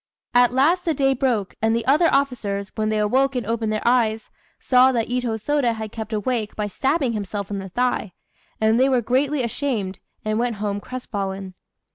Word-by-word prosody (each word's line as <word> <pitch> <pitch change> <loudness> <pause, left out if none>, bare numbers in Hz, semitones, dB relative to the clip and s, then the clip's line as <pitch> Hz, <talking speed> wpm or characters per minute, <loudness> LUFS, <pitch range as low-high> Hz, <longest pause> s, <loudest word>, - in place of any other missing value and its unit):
At 245 0 +5
last 310 +8 +3
the 330 -4 0
day 270 0 +3
broke, 240 -7 0
and 225 +1 +2
the 230 -1 -1
other 305 +5 +4
officers, 215 -8 -1
when 215 -1 -1
they 215 - 0
awoke 260 +6 +2
and 245 -3 -2
opened 225 0 -1
their 215 +1 -2
eyes, 225 -3 +1 0.3
saw 255 0 +5
that 235 -3 -1
Itô 245 -2 -1
Sôda 245 +1 0
had 220 -1 -6
kept 220 -1 -6
awake 215 0 -2
by 210 - -2
stabbing 265 - 0
himself 205 -1 -4
in 200 - -2
the 195 0 -7
thigh; 245 -3 -1 0.5
and 220 +2 +3
they 265 +1 +4
were 255 -2 +2
greatly 265 +4 +1
ashamed, 230 -6 -2 0.3
and 215 +1 0
went 240 -1 0
home 205 -1 -2
crestfallen. 195 -6 -5
230 Hz, 190 wpm, -22 LUFS, 210-260 Hz, 0.5 s, At